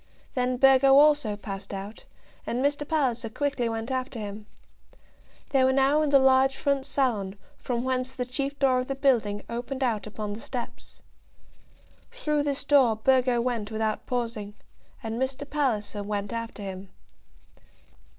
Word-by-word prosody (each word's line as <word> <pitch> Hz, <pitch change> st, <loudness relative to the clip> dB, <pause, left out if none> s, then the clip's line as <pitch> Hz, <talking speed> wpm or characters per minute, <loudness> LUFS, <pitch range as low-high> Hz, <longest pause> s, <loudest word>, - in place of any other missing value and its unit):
Then 250 Hz, 0 st, 0 dB
Burgo 270 Hz, +1 st, +6 dB
also 290 Hz, -7 st, +4 dB
passed 200 Hz, -1 st, -7 dB
out, 200 Hz, +3 st, -8 dB, 0.4 s
and 250 Hz, +3 st, 0 dB
Mr. 290 Hz, 0 st, 0 dB
Palliser 255 Hz, -7 st, 0 dB
quickly 275 Hz, -1 st, -1 dB
went 225 Hz, +2 st, -4 dB
after 255 Hz, -1 st, -3 dB
him. 210 Hz, 0 st, -7 dB, 1.0 s
They 270 Hz, -2 st, +4 dB
were 260 Hz, -, +4 dB
now 275 Hz, +3 st, +3 dB
in 305 Hz, -, +1 dB
the 280 Hz, -, +6 dB
large 265 Hz, 0 st, +4 dB
front 280 Hz, -1 st, 0 dB
salon, 215 Hz, -9 st, 0 dB, 0.2 s
from 240 Hz, -1 st, -2 dB
whence 260 Hz, 0 st, -1 dB
the 250 Hz, -, -2 dB
chief 275 Hz, +3 st, -3 dB
door 265 Hz, -2 st, +3 dB
of 255 Hz, -, -3 dB
the 275 Hz, -, -2 dB
building 230 Hz, -7 st, +1 dB
opened 245 Hz, +3 st, -4 dB
out 220 Hz, -5 st, -1 dB
upon 210 Hz, -1 st, -5 dB
the 210 Hz, -, -7 dB
steps. 250 Hz, -2 st, -7 dB, 1.1 s
Through 300 Hz, -12 st, -1 dB
this 285 Hz, -1 st, -1 dB
door 265 Hz, -6 st, +4 dB
Burgo 250 Hz, +1 st, +2 dB
went 235 Hz, -4 st, -2 dB
without 220 Hz, -1 st, -2 dB
pausing, 230 Hz, -5 st, -3 dB, 0.5 s
and 225 Hz, +2 st, -3 dB
Mr. 265 Hz, +2 st, -2 dB
Palliser 235 Hz, -8 st, -1 dB
went 205 Hz, +1 st, -3 dB
after 230 Hz, -2 st, -5 dB
him. 190 Hz, 0 st, -7 dB
250 Hz, 150 wpm, -27 LUFS, 220-275 Hz, 1.1 s, Burgo